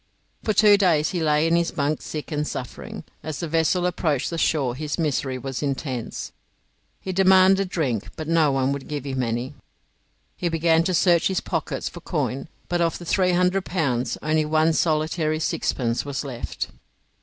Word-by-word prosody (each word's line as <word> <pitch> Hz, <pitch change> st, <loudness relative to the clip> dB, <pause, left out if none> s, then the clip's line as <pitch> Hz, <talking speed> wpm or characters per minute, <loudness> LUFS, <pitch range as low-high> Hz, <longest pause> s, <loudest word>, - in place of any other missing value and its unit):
For 215 Hz, -, 0 dB
two 210 Hz, -1 st, +6 dB
days 165 Hz, -6 st, +3 dB
he 180 Hz, -3 st, -2 dB
lay 150 Hz, 0 st, +3 dB
in 165 Hz, +1 st, +3 dB
his 170 Hz, 0 st, +2 dB
bunk 150 Hz, -1 st, -1 dB
sick 155 Hz, +1 st, -6 dB
and 150 Hz, 0 st, -1 dB
suffering. 125 Hz, -, -6 dB, 0.2 s
As 155 Hz, -2 st, -5 dB
the 170 Hz, -, -3 dB
vessel 165 Hz, +3 st, +1 dB
approached 160 Hz, -6 st, 0 dB
the 165 Hz, -, -3 dB
shore 140 Hz, -8 st, +1 dB
his 150 Hz, +3 st, -4 dB
misery 140 Hz, -5 st, -1 dB
was 135 Hz, 0 st, -5 dB
intense. 135 Hz, -4 st, -3 dB, 0.7 s
He 190 Hz, -, -5 dB
demanded 190 Hz, 0 st, +5 dB
drink, 135 Hz, -, -1 dB
but 155 Hz, -, -6 dB
no 160 Hz, -3 st, +3 dB
one 135 Hz, 0 st, +1 dB
would 140 Hz, -1 st, -4 dB
give 145 Hz, -2 st, -4 dB
him 130 Hz, -2 st, -2 dB
any. 120 Hz, +3 st, -2 dB, 0.8 s
He 175 Hz, -, -1 dB
began 165 Hz, 0 st, +3 dB
to 185 Hz, -, +1 dB
search 170 Hz, -1 st, +4 dB
his 190 Hz, -1 st, 0 dB
pockets -, -, -3 dB
for -, -, -8 dB
coin, 135 Hz, +4 st, -2 dB, 0.2 s
but 175 Hz, 0 st, 0 dB
of 165 Hz, -1 st, +1 dB
the 175 Hz, -, -10 dB
300 180 Hz, +1 st, +2 dB
pounds 135 Hz, -10 st, -1 dB
only 155 Hz, 0 st, +2 dB
one 155 Hz, +1 st, +2 dB
solitary 155 Hz, 0 st, +1 dB
sixpence 120 Hz, -6 st, -1 dB
was 140 Hz, 0 st, -4 dB
left. 125 Hz, -4 st, -5 dB
155 Hz, 175 wpm, -24 LUFS, 140-175 Hz, 0.8 s, two